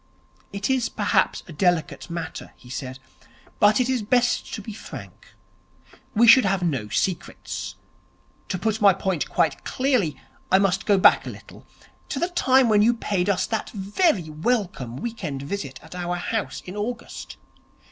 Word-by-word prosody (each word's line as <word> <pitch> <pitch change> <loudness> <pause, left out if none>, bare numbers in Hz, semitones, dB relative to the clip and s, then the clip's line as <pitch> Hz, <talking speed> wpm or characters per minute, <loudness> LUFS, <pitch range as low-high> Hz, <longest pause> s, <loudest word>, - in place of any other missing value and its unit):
'It 200 0 -2
is 260 -3 +1
perhaps - - +1
a 170 - -9
delicate 175 +1 0
matter,' 170 -1 -6
he 125 - -14
said, 130 -1 -5 0.6
'but 210 +2 +5
it 250 - +2
is 255 -2 0
best 245 +3 +1
to - - -4
be 215 +1 -7
frank. 210 - -11 0.8
We 230 +3 +6
should 255 +3 +9
have 195 -2 +1
no 135 -11 -1
secrets. 175 - -3 0.7
To 185 - -1
put 220 +4 -1
my 200 -3 +6
point 190 -4 -2
quite - - 0
clearly, 255 - 0 0.3
I 190 - +7
must 195 -1 +1
go 205 -2 +5
back 185 - +5
a - - -2
little, - - -13 0.4
to - - -3
the 345 +6 0
time 265 -7 +4
when 210 -2 +4
you 235 +3 +4
paid 200 -4 -1
us 190 -2 +2
that 220 -2 -3
very 200 - 0
welcome 155 - -1
week 230 - -6
end 140 -4 -3
visit 140 -5 -5
at - - -12
our 175 0 -3
house 215 +4 -3
in 185 - -8
August.' 235 +3 -5
200 Hz, 165 wpm, -24 LUFS, 175-230 Hz, 0.8 s, should